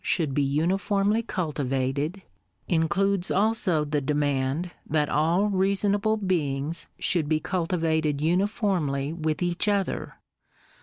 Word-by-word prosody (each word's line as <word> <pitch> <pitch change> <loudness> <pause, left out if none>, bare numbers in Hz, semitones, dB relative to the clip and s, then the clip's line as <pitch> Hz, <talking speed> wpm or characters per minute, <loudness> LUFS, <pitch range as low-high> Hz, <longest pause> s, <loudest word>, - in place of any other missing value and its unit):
should 155 -6 0
be 145 - +1
uniformly 195 +9 +1
cultivated, 145 - -2 0.4
includes 175 +3 +1
also 195 -6 +1
the 145 0 -1
demand 145 +3 0
that 150 -1 0
all 165 +6 +2
reasonable 200 +2 +1
beings 160 -6 -1
should 160 -4 0
ho 155 - +3
cultivated 160 -5 0
uniformly 170 -5 0
with 155 0 -2
each 175 +3 -1
other. 200 -2 -1
165 Hz, 105 wpm, -26 LUFS, 150-195 Hz, 0.4 s, ho